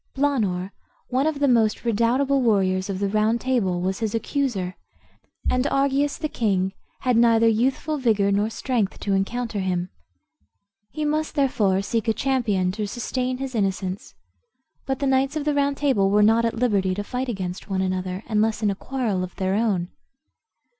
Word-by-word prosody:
Blaanor, 210 -10 0 0.4
one 260 +4 +1
of 315 -2 -1
the 285 - +3
most 230 -3 +2
redoubtable 245 +5 +2
warriors 190 -5 +1
of 195 - -2
the 200 +1 0
Round 215 +3 +1
Table, 230 -9 0
was 190 +1 -1
his 220 -1 -2
accuser, 225 -7 -2 0.7
and 255 +2 +1
Argius, 280 +1 +1
the 310 - -2
king, 195 -8 0 0.3
had 250 -2 +2
neither 230 -1 +5
youthful 265 +7 +1
vigor 210 -6 +2
nor 205 +2 +1
strength 225 -3 -2
to 200 - 0
encounter 220 +3 -1
him. 180 -1 -2 1.0
He 305 +9 -3
must 305 +1 -1
therefore 210 -9 +2
seek 225 +2 -2
a 225 - +3
champion 215 -9 0
to 210 +2 -3
sustain 250 +3 -2
his 270 0 -5
innocence. 195 -3 -2 0.7
But 265 -1 0
the 280 - -2
knights 270 +2 +2
of 300 -2 -2
the 300 - +2
Round 280 0 +1
Table 235 -10 +2
were 210 +1 +4
not 225 +2 +4
at 230 - -1
liberty 200 -6 +1
to 205 - -3
fight 250 +4 -3
against 190 -3 -5
one 190 -1 0
another, 185 +1 -3
unless 220 0 0
in 205 - +3
a - - -3
quarrel 220 -5 -2
of 185 - -7
their 190 0 -1
own. 200 -5 0
225 Hz, 175 wpm, -24 LUFS, 195-260 Hz, 1.0 s, neither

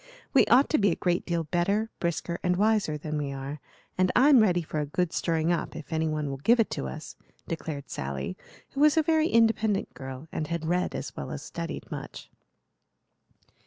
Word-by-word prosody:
We - - +5
ought 260 +4 +6
to 305 - +3
be 200 -1 +4
a 170 - +1
great 175 -1 -1
deal 170 -1 0
better, 195 +7 0
brisker, 170 0 -2
and 180 0 +1
wiser 205 -6 +2
than 150 0 -3
we 140 -1 -3
are, 135 +2 -6 0.4
and 185 0 +3
I'm 270 +1 +7
ready 180 -5 +3
for 155 -1 -4
a 150 - 0
good 180 +3 -1
stirring 165 0 +1
up 170 - -2
if 160 0 -7
any 160 0 +1
one 155 -1 -2
will 135 - -4
give 235 - +4
it 225 - +2
to 65 - -3
us," 65 - -8 0.3
declared 155 -4 -5
Sally, 70 +5 -4 0.4
who 275 - -6
was 300 +1 +5
a 320 - +5
very 315 0 +3
independent 225 -4 +2
girl 130 +2 -8
and 155 - -3
had 170 0 -3
read 180 +2 0
as - - -5
well - - -5
as - - -6
studied - - -6
much. - - -8
170 Hz, 200 wpm, -27 LUFS, 150-215 Hz, 0.4 s, I'm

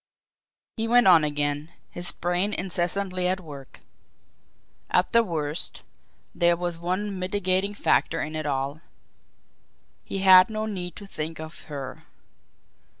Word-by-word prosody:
He 225 0 -1
went 245 +1 +5
on 175 -4 +7
again 145 +1 -1 0.2
his 175 0 0
brain 180 +4 -1
incessantly 185 +1 0
at 185 +1 0
work. 145 -6 -11 1.1
At 180 - +2
the 230 0 +5
worst, 155 -5 -3 0.5
there 170 -1 +3
was 175 -1 -3
one 185 +3 -2
mitigating 190 +1 0
factor - - +1
in 155 +1 -4
it 155 -1 -3
all. 140 +2 -2 1.2
He - - -5
had 185 +1 +8
no 215 0 -3
need 180 -5 -4
to 205 - -9
think 160 -4 -5
of 160 +1 -9
her. 135 -3 -7
175 Hz, 130 wpm, -25 LUFS, 155-190 Hz, 1.2 s, had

